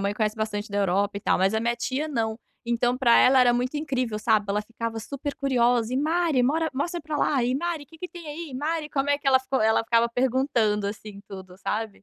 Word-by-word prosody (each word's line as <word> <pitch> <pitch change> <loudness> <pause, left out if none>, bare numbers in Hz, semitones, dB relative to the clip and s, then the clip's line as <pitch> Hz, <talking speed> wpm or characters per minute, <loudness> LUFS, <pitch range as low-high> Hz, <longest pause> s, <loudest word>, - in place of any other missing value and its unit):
mãe 200 +1 -1
conhece 215 -1 0
bastante 215 -1 -3
da 205 - -1
Europa 200 +1 +1
e - - -15
tal - - +2
mas, 190 +3 +2
a 220 - +1
minha 235 +1 0
tia 270 +5 -2
não. 225 -4 -2 0.3
Então 240 +1 +1
pra 245 -3 +5
ela 260 +1 +6
era 245 -1 +5
muito 250 +4 -1
incrível, 255 -7 -2
sabe. 215 -2 +2
Ela 210 +1 0
ficava 230 0 -5
super 280 +5 -5
curiosa 245 -3 +1
e: - - 0
"Mari, 315 -2 +1
mora 315 +5 +1
mostra 345 +5 -2
pra 305 -1 -3
lá, 265 -5 +2
e 250 - 0
Mari 320 +1 -2
que 320 +3 -18
que 360 - -6
tem 345 -3 -11
aí? 300 -1 -7
Mari 305 +3 -2
como 285 0 -1
é 285 - +2
que" 285 -2 -1
Ela 260 -1 +6
ficou 265 -1 -2
ela 220 +1 +3
ficava 230 0 +3
perguntando, 235 -4 +1
assim, 205 0 -7
tudo, 190 -2 -10
sabe. 210 -1 -4
245 Hz, 235 wpm, -25 LUFS, 215-285 Hz, 0.3 s, ela